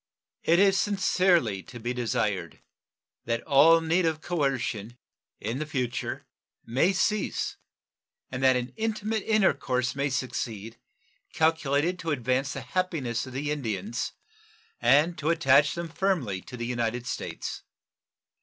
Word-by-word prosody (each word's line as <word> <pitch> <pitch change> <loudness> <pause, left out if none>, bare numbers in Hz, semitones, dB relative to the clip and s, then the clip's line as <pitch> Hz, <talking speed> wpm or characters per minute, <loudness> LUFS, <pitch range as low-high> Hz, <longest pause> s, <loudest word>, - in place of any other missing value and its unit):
It 170 - +3
is 195 0 +5
sincerely 180 - +2
to 120 - -11
be 120 +2 -2
desired 105 -7 -2 0.7
that 115 0 -1
all 165 +3 +6
need 165 +3 +2
of 160 -2 0
coercion 130 - -2 0.4
in 120 +8 -3
future 130 -5 -3 0.4
may 130 +11 +2
cease 210 +2 -1 0.7
and 130 0 -4
that 130 -1 +5
an 125 0 -3
intimate 220 0 -1
intercourse 130 - +2
may 140 +1 0
succeed, 115 -4 -4 0.5
calculated 160 +2 +1
to 165 -2 -4
advance 130 -1 0
the 140 - -5
happiness 135 -5 -2
of 130 - -9
the 145 +3 -2
Indians 115 -6 -3 0.7
and 155 +5 +4
to 150 +2 0
attach 145 -3 +4
them 170 0 -4
firmly 160 - -1
to 125 - -10
the 120 - -3
United 120 0 -2
States. - - -5
140 Hz, 125 wpm, -27 LUFS, 120-170 Hz, 0.7 s, all